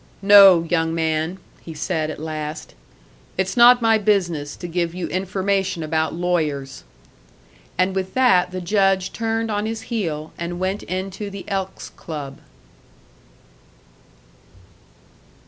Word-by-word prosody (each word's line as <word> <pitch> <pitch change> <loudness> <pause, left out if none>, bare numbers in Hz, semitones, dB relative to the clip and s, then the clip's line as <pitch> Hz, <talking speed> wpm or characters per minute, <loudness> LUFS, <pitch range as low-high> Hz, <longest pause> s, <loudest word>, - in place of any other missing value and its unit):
"No, 195 -4 +8
young 165 -1 0
man," 160 +2 -1 0.2
he 165 - -9
said 155 0 -2
at 155 - -6
last, 155 0 -6 0.6
"it's 190 0 -1
not 245 0 +7
my 225 -1 +4
business 175 -8 0
to 175 - -7
give 170 0 -2
you 180 -1 -3
information 190 -1 -1
about 160 0 0
lawyers." 155 -6 -2 0.9
And 185 +1 +2
with 190 0 -4
that 190 -9 +4
the 185 0 -5
judge 195 0 +1
turned 225 0 -2
on 210 +1 -1
his 225 0 -4
heel 160 -8 -3
and 175 +1 -4
went 190 +2 -2
into 190 +2 -5
the 195 -1 -9
Elks' 190 -1 -4
Club. 145 -4 -8
185 Hz, 125 wpm, -21 LUFS, 160-195 Hz, 0.9 s, No